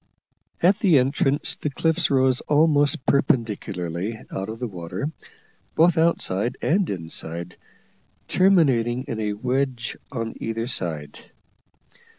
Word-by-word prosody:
At 190 +4 +4
the 175 -7 +5
entrance 135 +2 +1
the 150 - -2
cliffs 160 +4 0
rose 130 -2 +3
almost 145 -1 +3
perpendicularly 105 - 0
out 95 +2 -4
of 110 - -5
the 125 - -3
water, 95 - -5 0.6
both 165 +1 +5
outside 125 - +1
and 185 +3 +1
inside, 85 -1 -4 0.7
terminating 130 -11 +3
in 115 - -5
a 105 -1 -1
wedge 125 +2 -2 0.2
on 115 -4 -3
either 115 0 -3
side. 80 - -4
125 Hz, 115 wpm, -23 LUFS, 105-150 Hz, 0.7 s, the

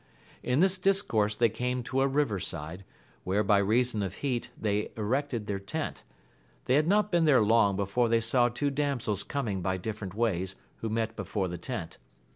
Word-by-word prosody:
In 125 +5 +1
this 190 0 +3
discourse 180 - +2
they 115 +1 +3
came 125 +3 -2
to 130 +3 -1
a 135 - +4
river 135 -7 +1
side, 85 +3 -5 0.4
where 100 +3 +1
by 100 0 +4
reason 110 +2 +2
of 95 -1 -3
heat 125 -4 -2
they 105 -1 0
erected 120 +1 -1
their 100 -2 -2
tent; 100 - -4 0.6
they 125 - +2
had 150 +3 +3
not 210 +2 +3
been 170 -2 +3
there 135 -7 +5
long 105 -2 +4
before 100 +5 +1
they 115 0 +4
saw 120 +2 +2
two 140 +4 -1
damsels 135 -8 -1
coming 110 -10 -2
by 95 +1 -1
different 100 -1 -5
ways 95 -5 -1 0.2
who 115 - -4
met 110 0 -1
before 100 -4 -2
the 90 -1 -5
tent. 95 -5 -6
115 Hz, 185 wpm, -29 LUFS, 100-135 Hz, 0.6 s, there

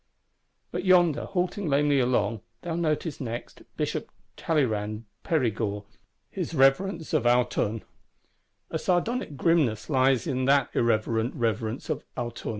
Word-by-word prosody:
But - - -3
yonder, 175 -5 +4
halting 180 -1 -2
lamely 145 0 +3
along, 120 -3 +1 0.2
thou 170 -1 -3
noticest 155 -2 -1
next 120 -2 -6 0.2
Bishop - - -2 0.3
Talleyrand 110 -8 -1 0.2
Perigord, 110 -9 0 0.5
his 165 - -4
Reverence 160 +5 +2
of 120 - +2
Autun. 120 -3 +1 0.9
A - - -1
sardonic 180 - -1
grimness 145 -9 +1
lies 130 -2 +3
in 130 0 -1
that 140 -1 +3
irreverent 115 +1 +1
Reverence 115 -1 -2
of - - -3
Autun. 120 -1 -4
130 Hz, 120 wpm, -27 LUFS, 115-160 Hz, 0.9 s, yonder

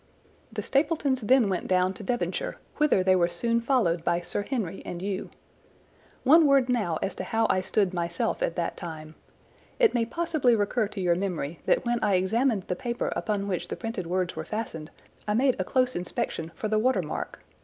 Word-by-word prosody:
"The - - -4
Stapletons 280 -2 +1
then 240 +1 +4
went 185 -2 -2
down 185 0 +2
to 190 - -11
Devonshire, 245 - -2 0.2
whither 300 -11 +3
they 185 0 +4
were 175 -2 +3
soon 230 +7 0
followed 225 - +1
by 170 0 +1
Sir 175 +3 -3
Henry 205 -6 -3
and 175 - -6
you. 195 +1 -3 0.9
One 310 +4 +7
word 275 -2 +4
now 210 -10 +1
as - - -1
to - - -3
how 225 0 +1
I 185 - +1
stood 190 0 +1
myself 170 -1 -1
at 165 - 0
that 170 - -2
time. 155 -2 -8 0.6
It 470 -3 +4
may 235 -2 +1
possibly 310 -5 +2
recur 215 +1 +1
to 205 -1 -6
your 175 -1 +3
memory 170 -4 -3
that - - +2
when 240 0 +1
I 200 - +3
examined 215 +3 +1
the 180 - -3
paper 240 +5 -2
upon 205 -2 -1
which 185 -4 -2
the - - -4
printed 225 -7 -4
words 180 0 -1
were - - -4
fastened 170 -8 -5 0.4
I 210 - +1
made 260 +2 +3
a - - +1
close 255 +5 +1
inspection 170 -2 -3
for 215 - -3
the 215 0 +2
water 255 +4 +2
mark. - - -5
205 Hz, 195 wpm, -27 LUFS, 180-245 Hz, 0.9 s, One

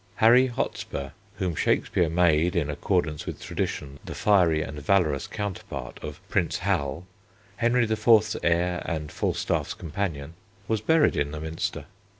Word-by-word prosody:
Harry 120 +4 +6
Hotspur, 70 - -4 0.2
whom 90 -2 -2
Shakespeare 85 +2 +1
made 85 +1 +3
in 75 -4 0
accordance 75 -1 -1
with - - -5
tradition 70 -1 -4
the - - -7
fiery 85 -7 +3
and 75 0 -7
valorous 75 -3 +1
counterpart 85 -11 -5
of 75 +1 -6
Prince 100 -4 0
Hal, 90 -3 -1 0.5
Henry 120 +1 +3
IV.'s 110 -1 +3
heir 90 +1 +1
and 80 -3 -3
Falstaff's - - -1
companion, 80 -3 -4 0.3
was 110 -2 0
buried 160 +7 +3
in 70 0 0
the 75 +1 -6
Minster. 80 -2 -4
85 Hz, 140 wpm, -26 LUFS, 75-100 Hz, 0.5 s, Harry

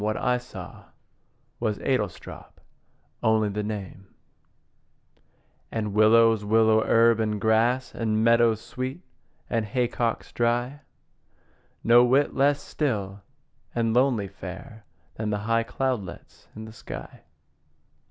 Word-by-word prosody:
What 105 +1 -1
I 125 0 +1
saw 125 - -11 0.7
Was 110 -3 -1
Adlestrop 130 -1 -4 0.6
only 110 -1 +2
the 105 +1 -3
name 100 -2 -6 1.6
And 105 -3 -3
willows, 110 0 +5
willow 110 +1 +3
herb, 115 0 +4
and 105 -1 -1
grass, 115 +4 +1
And 110 -1 0
meadowsweet, 120 +5 +1 0.5
and 115 -2 0
haycocks 120 0 -2
dry; 120 +4 -1 1.0
No 120 +1 +6
whit 135 +4 +2
less 140 +1 +2
still 100 -9 -3 0.5
and 115 -1 +1
lonely 120 -5 +2
fair 110 +2 -10 0.3
Than 110 -1 -2
the 105 - 0
high 115 0 +2
cloudlets 125 -4 -4
in 110 +1 -8
the 110 - -11
sky. - - -9
115 Hz, 110 wpm, -25 LUFS, 110-120 Hz, 1.6 s, No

